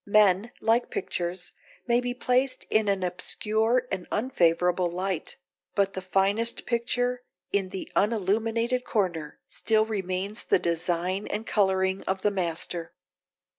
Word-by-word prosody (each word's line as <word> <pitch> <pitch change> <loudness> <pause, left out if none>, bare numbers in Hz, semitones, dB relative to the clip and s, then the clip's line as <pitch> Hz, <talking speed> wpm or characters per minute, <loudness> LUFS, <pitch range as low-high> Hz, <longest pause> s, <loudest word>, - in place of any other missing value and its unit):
Men, 205 +1 +4
like 230 +2 +2
pictures, 175 -1 -3 0.3
may 240 0 +3
be 245 0 -3
placed 255 +1 +1
in 215 -1 +3
an 195 -2 +1
obscure 220 +7 0
and 190 -2 -3
unfavourable 180 -6 +2
light; 180 0 -3 0.4
but 200 -1 +2
the 190 - -4
finest 195 +5 +1
picture, 245 +1 0 0.3
in 195 -2 +1
the 190 0 -6
unilluminated 225 +4 +1
corner, 175 -10 -1
still 220 -1 +2
retains 195 -1 -2
the - - +4
design 175 +2 -1
and 220 - -3
colouring 190 -2 +2
of 190 0 -2
the 210 - +3
master. 170 -2 -2
195 Hz, 130 wpm, -27 LUFS, 180-225 Hz, 0.4 s, Men